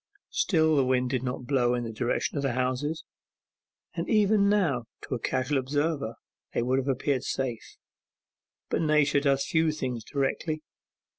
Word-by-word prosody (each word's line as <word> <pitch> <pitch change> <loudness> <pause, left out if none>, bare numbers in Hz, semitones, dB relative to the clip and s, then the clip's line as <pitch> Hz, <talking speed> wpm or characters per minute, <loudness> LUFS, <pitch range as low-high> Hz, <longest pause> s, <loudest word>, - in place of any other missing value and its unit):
Still 160 -4 +3
the 140 - +4
wind 125 -1 +1
did 130 -3 0
not 125 -1 -4
blow 125 -2 +2
in 120 - -2
the 115 -1 -5
direction 120 +7 -1
of 140 - 0
the 135 -3 0
houses, 130 +5 -1 0.9
and - - -3
even 210 -2 +4
now 165 - +2 0.2
to - - -5
a 125 - -1
casual 130 +4 0
observer 140 -2 -1 0.4
they - - +2
would 130 +2 +2
have 135 - -3
appeared 135 0 0
safe. 125 -4 -3 0.9
But - - 0
Nature 150 -2 +3
does 140 -1 +2
few 160 -1 +2
things 125 -6 -3
directly. 150 +4 -2
135 Hz, 160 wpm, -28 LUFS, 125-155 Hz, 0.9 s, the